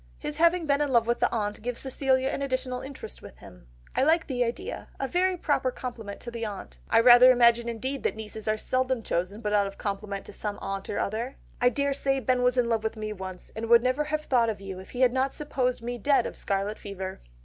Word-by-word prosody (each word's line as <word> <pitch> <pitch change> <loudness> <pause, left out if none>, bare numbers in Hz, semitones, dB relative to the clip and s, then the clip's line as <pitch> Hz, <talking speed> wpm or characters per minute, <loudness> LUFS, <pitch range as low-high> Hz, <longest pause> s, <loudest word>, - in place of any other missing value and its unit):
His 295 - -5
having 335 +1 +3
been 285 -1 +2
in 290 -2 0
love 235 -2 +4
with 235 +1 0
the - - +2
aunt 210 -2 -2
gives 245 +1 -3
Cecilia 265 0 +1
an - - -3
additional 255 -2 -2
interest 265 - -9
with - - -12
him. - - -15 0.3
I - - +2
like 320 +4 +3
the 250 -4 0
idea, 360 - -4
a 270 - -1
very 365 +3 +1
proper 285 -5 +1
compliment 235 -5 -6
to 240 -1 -8
an 230 - -4
aunt! 205 -3 -6
I 225 - +5
rather 245 +2 +9
imagine 235 -1 +4
indeed 260 +4 -3
that - - -1
nieces 220 0 -7
are 215 0 +2
seldom 255 +1 0
chosen 185 +5 -2
but 210 -2 -1
out 205 -1 +3
of 195 - -9
compliment 200 -1 -4
to - - -10
some 210 -1 -4
aunt 195 0 -5
or - - -2
other. 230 +6 -2 0.3
I 245 - +6
daresay 275 +1 0
Ben 255 -1 +1
was 250 0 +2
in 245 -1 +3
love 225 -2 0
with 220 0 -2
me 215 0 -4
once, 185 -2 -7
and 225 +1 -4
would 235 0 +7
never 255 +4 +1
have 305 0 -1
thought 245 -6 +2
of 215 - -3
you 195 -1 -7
if 190 - -12
he 250 - -4
had 250 -1 +5
not 265 +1 +1
supposed 255 -5 -1
me 240 +1 -4
dead 275 +1 +3
of - - -5
scarlet 200 +2 -2
fever." 190 -2 -6
240 Hz, 240 wpm, -27 LUFS, 210-265 Hz, 0.3 s, rather